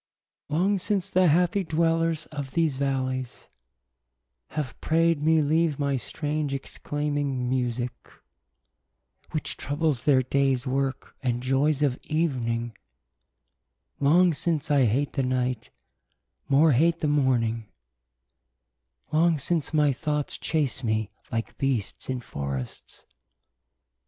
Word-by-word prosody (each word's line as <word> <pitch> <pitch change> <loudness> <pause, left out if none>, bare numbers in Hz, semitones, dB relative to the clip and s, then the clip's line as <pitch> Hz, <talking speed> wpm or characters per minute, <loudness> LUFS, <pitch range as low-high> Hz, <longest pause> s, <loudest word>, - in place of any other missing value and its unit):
Long 190 +6 +2
since 195 -1 -1
the 185 0 +4
happie 175 +5 +3
dwellers 165 -1 +1
of 140 -3 -5
these 165 -5 +1
vallies, 130 -2 -2 1.0
Have 150 -4 -4
praide 165 -1 +2
me 160 0 +4
leave 155 0 +2
my 140 -1 0
strange 145 +3 -2
exclaiming 145 -2 -2
musique, 125 -1 -2 1.2
Which 155 - -4
troubles 145 -2 -1
their 135 -3 +4
dayes 135 -1 +1
worke, 135 0 -2
and 125 -2 -1
joyes 140 +3 +2
of 135 -3 +1
evening: 120 -7 -1 1.2
Long 170 +5 +5
since 155 +1 -1
I 140 -3 +5
hate 135 +6 0
the 135 - 0
night, 125 -2 -1 0.8
more 150 +3 +5
hate 165 +6 +3
the 155 - +1
morning: 120 -6 +1 1.4
Long 165 +1 +3
since 160 +2 0
my 150 -3 +3
thoughts 150 +1 -2
chase 145 -5 -1
me 110 -2 -1 0.2
like 115 -1 -4
beasts 130 -6 -2
in 130 -1 -2
for 70 - -5
rests. 65 -2 -7
140 Hz, 115 wpm, -26 LUFS, 130-160 Hz, 1.4 s, Long